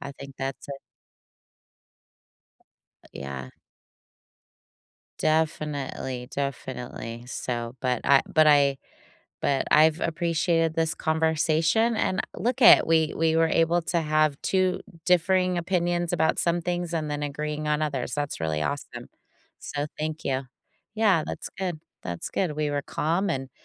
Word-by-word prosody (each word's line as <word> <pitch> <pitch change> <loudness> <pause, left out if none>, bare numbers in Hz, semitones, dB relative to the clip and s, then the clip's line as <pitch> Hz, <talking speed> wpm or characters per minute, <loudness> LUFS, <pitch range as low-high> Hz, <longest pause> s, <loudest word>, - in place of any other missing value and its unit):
I 140 - -7
think 140 0 -11
that's 135 +1 -5
a - - -4 2.3
But, - - -20
yeah. 65 -1 -6 1.7
Definitely, 150 -5 -1
definitely, 125 -4 -5
so 120 -1 -4
but 125 -2 0
I 140 -1 +5
but 155 -1 +5
I 140 -2 +5 0.6
but 135 -1 +1
I've 155 +2 +5
appreciated 165 0 +1
this 165 0 0
conversation, 160 +7 +1
and 185 - 0 0.2
look 250 +3 -1
at 235 - +8
we 160 -1 +3
we 160 0 +2
were 165 0 +4
able 165 +2 +2
to 170 +1 0
have 155 -2 +1
2 185 -1 +1 0.2
differing 180 0 +3
opinions 175 -1 0
about 160 -2 +1
some 170 0 +1
things 175 0 -2
and 155 -2 -2
then 145 0 -3
agreeing 150 +1 -3
on 150 0 +1
others, 135 -5 -2
that's 145 - -3
really 80 -1 -1
awesome, 75 - -4 0.5
so 145 0 -4
thank 155 +1 -4
you. 135 -1 0 0.5
Yeah, 205 -7 +3
that's - - -6
good, 180 -5 -3 0.2
that's 85 -1 -5
good, 180 -5 -1
we 150 -1 -1
were 145 -1 -1
calm, 170 +8 -1
and 135 0 -3
155 Hz, 135 wpm, -26 LUFS, 140-170 Hz, 2.3 s, at